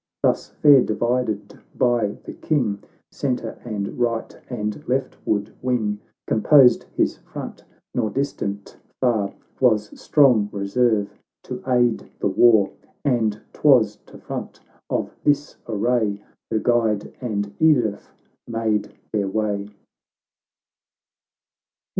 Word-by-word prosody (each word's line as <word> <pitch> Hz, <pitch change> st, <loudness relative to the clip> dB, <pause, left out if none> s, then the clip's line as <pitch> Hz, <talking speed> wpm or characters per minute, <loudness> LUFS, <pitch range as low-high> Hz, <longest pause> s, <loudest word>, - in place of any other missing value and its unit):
Thus -, -, +1 dB
fair 145 Hz, -3 st, +6 dB
divided 115 Hz, -3 st, -1 dB, 0.2 s
by 120 Hz, -4 st, +1 dB
the -, -, -8 dB
King, 120 Hz, -10 st, -1 dB, 0.3 s
Centre, 125 Hz, -4 st, -3 dB
and 105 Hz, -2 st, -4 dB
right, 115 Hz, -2 st, -1 dB
and 105 Hz, -4 st, -4 dB
left 130 Hz, +1 st, -1 dB
ward 105 Hz, 0 st, 0 dB
wing. 110 Hz, -5 st, 0 dB, 0.3 s
Composed 125 Hz, +3 st, +5 dB
his -, -, +1 dB
front; -, -, -9 dB, 0.3 s
nor 115 Hz, -3 st, 0 dB
distant 105 Hz, -8 st, -3 dB, 0.2 s
far 110 Hz, -6 st, +1 dB, 0.3 s
Was 110 Hz, -5 st, +3 dB
strong 125 Hz, -9 st, +4 dB
reserve 105 Hz, +1 st, 0 dB, 0.2 s
to -, -, -6 dB
aid 120 Hz, -3 st, +2 dB
the -, -, 0 dB
war. 110 Hz, 0 st, +5 dB, 0.3 s
And 110 Hz, -6 st, +1 dB
'twas 115 Hz, -8 st, +4 dB
to -, -, -13 dB
front -, -, -7 dB, 0.3 s
of -, -, -1 dB
this 145 Hz, 0 st, +1 dB
array, 110 Hz, -1 st, 0 dB, 0.3 s
Her -, -, 0 dB
guide 110 Hz, -3 st, +1 dB
and 100 Hz, -4 st, -3 dB
Edith 125 Hz, -10 st, +2 dB, 0.4 s
made 115 Hz, -3 st, -1 dB, 0.2 s
their 105 Hz, -3 st, 0 dB
way. 100 Hz, 0 st, -1 dB
110 Hz, 110 wpm, -22 LUFS, 105-125 Hz, 0.4 s, fair